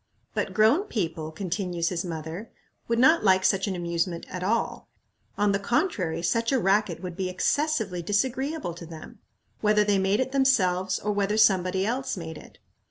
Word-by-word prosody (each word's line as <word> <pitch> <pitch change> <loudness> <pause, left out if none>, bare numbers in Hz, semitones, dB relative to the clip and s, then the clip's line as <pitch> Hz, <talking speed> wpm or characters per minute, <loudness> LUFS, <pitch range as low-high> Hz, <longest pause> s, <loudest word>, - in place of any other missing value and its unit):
"But - - -2
grown 225 - +4
people," 165 - -3
continues 175 -1 -2
his 175 -2 -2
mother, 165 +4 -6 0.4
"would 230 - 0
not 315 +7 +5
like 190 -2 +4
such 195 +1 +2
an 195 - -2
amusement 170 0 -2
at 180 - -5
all. 220 +5 -1 0.5
On 205 0 +2
the 200 - +1
contrary, 200 - -1
such 230 +6 +1
a 270 - +3
racket 195 -4 +1
would 180 -2 -5
be 185 0 -2
excessively 220 - 0
disagreeable 260 - -1
to 170 0 -10
them, 165 +7 -11 0.4
whether 210 0 +3
they 205 -1 +2
made 195 +3 +1
it 260 0 -1
themselves 190 -9 +2
or 210 - -2
whether 205 +1 0
somebody 190 -3 +3
else 250 0 -2
made 160 -3 -7
it. - - -16
195 Hz, 170 wpm, -26 LUFS, 175-230 Hz, 0.5 s, not